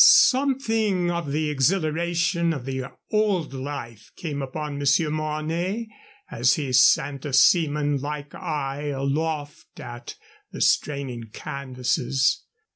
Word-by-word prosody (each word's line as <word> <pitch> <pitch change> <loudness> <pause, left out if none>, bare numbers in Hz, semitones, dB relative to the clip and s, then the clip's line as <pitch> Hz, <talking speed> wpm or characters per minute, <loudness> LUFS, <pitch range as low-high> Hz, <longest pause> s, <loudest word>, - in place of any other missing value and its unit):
Something 225 -9 +4
of 170 -4 -3
the 150 +1 0
exhilaration 170 +3 +1
of 135 -5 -6
the 130 -1 -3 0.3
old 205 -9 +1
life 130 -5 -6
came 145 -4 -4
upon 145 +2 -4
Monsieur 145 +2 +2
Mornay 160 +8 -2 0.4
as 120 +2 +3
he 140 -4 -3
sent 135 +2 +4
a 145 - -5
seaman 145 0 +4
like 145 +1 -5
eye 145 -1 -3
aloft 145 +2 -3
at 120 +1 -8 0.4
the - - -7
straining 135 -5 0
canvases. 130 +1 -1
150 Hz, 115 wpm, -24 LUFS, 135-170 Hz, 0.4 s, Something